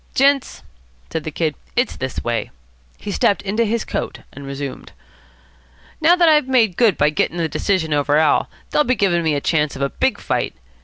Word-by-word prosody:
"Gents," 275 0 +2 0.5
said 160 - -3
the - - -2
Kid, 155 0 -1 0.2
"it's 245 +1 +1
this 130 -1 -4
way." 120 -1 -2 0.5
He 205 - -6
stepped 200 +1 +1
into 215 +4 0
his 225 +1 -1
coat, - - -4
and 140 0 -9
resumed. 140 0 -6 1.1
"Now 335 +3 +6
that 350 -2 +4
I've 300 -4 +4
made 230 -8 +3
good 225 -3 +3
by 150 +1 +3
getting 160 +3 -1
the 165 -1 0
decision 160 +1 -1
over 145 0 +2
Al., 155 -1 +3 0.2
they'll 300 - +3
be 255 -2 +1
giving 185 -6 +2
me 160 -2 +1
a 140 - -1
chance 150 -2 0
of 135 - -3
a 140 - -1
big 260 -6 0
fight. - - -2
170 Hz, 195 wpm, -20 LUFS, 150-235 Hz, 1.1 s, Now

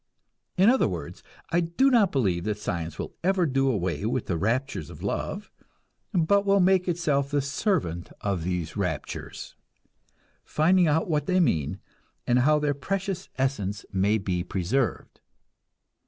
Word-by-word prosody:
In 190 +3 +5
other 260 +3 +4
words, 85 -7 -6 0.3
I 170 - +3
do 175 +11 +2
not 220 -7 +4
believe 95 -11 0
that 105 -1 -1
science 85 -6 -4
will - - -5
ever 185 -1 +2
do 135 -2 +1
away 95 -5 -1
with 120 +1 -1
the 90 - -1
raptures 115 - -1
of - - -11
love, - - -3 0.6
but 195 +3 +3
will 200 0 +3
make 185 0 +3
itself 150 -5 0
the 145 0 +1
servant 135 - -1
of 100 -5 -2
these 90 -3 -3
raptures, 90 -9 -4 0.9
finding 175 +3 +3
out 155 +2 +2
what 150 -4 0
they 185 0 +3
mean, 80 - +1 0.5
and 125 0 +3
how 150 +4 +4
their 150 -1 +1
precious 190 +6 -3
essence 110 -6 -1
may 100 +3 +2
be 90 -4 -2
preserved. 95 +6 -2
135 Hz, 150 wpm, -26 LUFS, -, 0.9 s, In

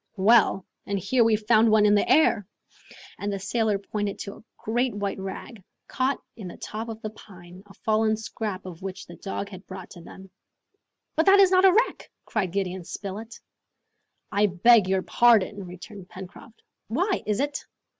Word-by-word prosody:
"Well; 200 -1 +4 0.2
and 200 - -1
here 240 +6 +2
we've 220 -1 +1
found 220 0 +5
one 215 -1 +5
in 205 - +5
the 205 - +2
air!" 225 -10 +4 0.7
And 205 0 -2
the 200 - -2
sailor 215 +1 0
pointed 205 0 -4
to 200 - -6
a - - -16
great 240 +1 -1
white 200 -1 -3
rag, 195 +2 -7 0.2
caught 265 +1 -1 0.2
in 210 -6 -8
the 175 - -9
top 220 +2 -6
of 220 -1 -6
the 215 - -4
pine, 180 -4 -14
a 195 - -16
fallen 220 0 +1
scrap 215 -3 -5
of 180 -1 -9
which 190 -1 -6
the 175 - -12
dog 200 0 -5
had 190 -1 -12
brought 185 -1 -9
to 175 - -11
them. 190 +2 -13 0.8
"But 320 +3 +1
that 395 +1 +7
is 385 -2 +6
not 370 0 +5
a 380 - +8
wreck!" 455 +6 0 0.2
cried 195 -6 -2
Gideon 190 -1 -2
Spilett. 205 +6 -7 0.9
"I 205 +1 +3
beg 205 +2 +5
your 190 -1 +1
pardon!" 210 -4 +3
returned 180 +2 -11
Pencroft. 190 +4 -12 0.2
"Why? 365 - 0
is 210 -1 0
it 285 +1 -2
210 Hz, 180 wpm, -25 LUFS, 190-230 Hz, 0.9 s, a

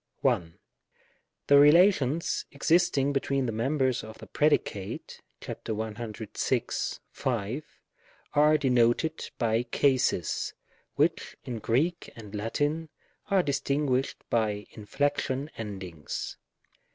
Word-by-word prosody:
1. 85 -1 0 0.9
The 140 0 +7
relations 155 -1 +4
existing 145 -2 +2
between 135 -1 0
the 115 - -1
members 130 +3 0
of 110 0 -10
the - - -10
predicate 105 -10 -1 0.2
(§106, 110 0 -3
5), 120 +3 -2 0.7
are 150 +1 +5
denoted 130 +3 +2
by 115 -1 +2
cases, 125 - +1 0.4
which - - 0
in 125 -4 -5
Greek 150 +11 0
and 105 -3 -11
Latin 145 +9 -1 0.4
are 195 -2 +4
distinguished 140 -2 0
by 105 -3 0
inflection 140 +5 -1
endings. 95 -8 -6
130 Hz, 90 wpm, -28 LUFS, 110-145 Hz, 0.9 s, The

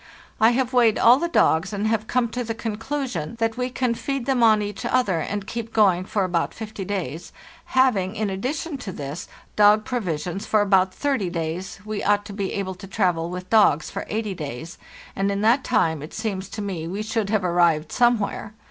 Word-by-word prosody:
"T 225 +2 +6
have 255 0 0
weighed 235 -3 +4
all 245 +3 +6
the 340 - 0
dogs 190 - +2
and 205 0 -2
have 220 0 0
come 250 -1 +1
to 245 +2 -3
the 225 -1 -4
conclusion 225 - -4
that 225 -1 0
we 250 0 -2
can 250 -1 0
feed 275 +1 -3
them 260 -2 +1
on 215 -2 +5
each 205 -1 -5
other 205 -10 +1
and 200 +5 -3
keep 230 +2 -5
going 190 -5 +3
for 200 0 0
about 175 -2 -1
fifty 215 -3 -6
days; 175 -4 -4 0.3
having, 255 - +2
in 215 0 -1
addition 275 - -3
to 210 -6 -6
this, 145 +1 -6 0.3
dog 210 +1 +5
provisions 180 -5 -3
for 215 - +3
about 190 -2 +3
thirty 265 -6 -1
days, 170 +4 -4
we 215 -1 -3
ought 205 0 +2
to 205 - -8
be 195 -1 -3
able 190 -2 -3
to 185 +2 -11
travel 180 -5 0
with 180 +1 -7
dogs 205 -9 +4
for - - -5
eighty 215 -2 -2
days, 155 -1 -7 0.4
and 195 +1 0
in 200 0 -2
that 235 +5 +3
time 160 - +1
it 150 - -9
seems 200 -4 -3
to 210 - -5
me 175 -5 -4
we 200 +5 -3
should 215 -2 -2
have 215 -2 +1
arrived 170 -3 +2
somewhere. 225 -3 +1
205 Hz, 200 wpm, -23 LUFS, 185-230 Hz, 0.4 s, T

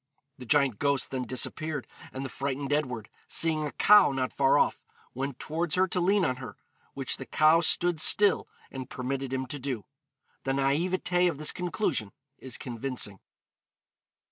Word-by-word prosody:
The 125 - -9
giant 140 -6 +2
ghost 140 -2 0
then 130 -1 -2
disappeared, 145 +2 -2 0.3
and 135 +1 -5
the - - -5
frightened 140 +1 -3
Edward, 125 -8 -2 0.2
seeing 160 -2 +1
a 150 - -3
cow 210 -7 +6
not 130 -1 -2
far 135 -1 +3
off, - - +1 0.3
went 135 0 -4
towards 160 +2 -2
her 185 +1 +3
to 180 - 0
lean 195 +2 +3
on 130 -1 -1
her, 125 -6 -9 0.4
which - - -1
the - - -7
cow 155 +2 +4
stood 175 -1 +1
still 205 +3 +5 0.2
and 130 -2 -7
permitted 130 +1 -4
him 130 0 -2
to 140 +3 -7
do. 125 -7 -4 0.6
The 135 - -1
naïveté 175 +6 +1
of 155 - -5
this 155 +1 -1
conclusion 175 - -2 0.3
is 130 -2 -5
convincing. 120 -5 -3
140 Hz, 165 wpm, -28 LUFS, 130-160 Hz, 0.6 s, cow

